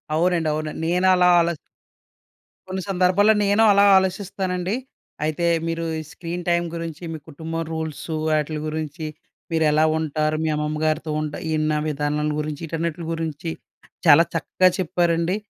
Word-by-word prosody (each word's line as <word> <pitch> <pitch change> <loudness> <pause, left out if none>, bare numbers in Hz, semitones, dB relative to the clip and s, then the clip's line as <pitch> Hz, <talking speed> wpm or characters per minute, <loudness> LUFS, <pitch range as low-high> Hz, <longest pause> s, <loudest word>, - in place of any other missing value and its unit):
అవునండి. 170 -1 +2
అవునండి. 155 0 -4
నేనలా 180 +1 +4
ఆలోచి 170 -1 +1 1.1
కొన్ని 190 0 -3
సందర్భాల్లో 190 +3 +4
నేను 205 +3 +4
అలా 200 0 +5
ఆలోచిస్తానండి. 190 0 -1 0.5
అయితే, 155 +2 -1 0.2
మీరు 165 0 -2
ఈ - - -4
స్క్రీన్ 175 +1 -6
టైమ్ 170 0 +2
గురించి 165 0 -6
మీ 160 - -4
కుటుంబం 165 +2 -4
రూల్సు, 160 0 -4 0.2
ఆటిలి 150 0 -2
గురించి 155 0 -4 0.5
మీరెలా 155 -1 +3
ఉంటారు, 155 0 -1
మీ 160 - 0
అమ్మమ్మ 150 0 -2
గారితో 155 0 0
ఉంటా 150 -1 -4 0.2
ఇన్ని 155 0 +1 0.2
విధానాల 150 0 -1
గురించి. 150 0 -4
ఈ‌ట‌న్ని‌టలి 165 +1 -3
గురించి 160 0 -4 0.6
చాలా 155 +2 +8
చక్కగా 185 +2 +2
చెప్పారండి. 170 0 +1
165 Hz, 130 wpm, -23 LUFS, 155-180 Hz, 1.1 s, చాలా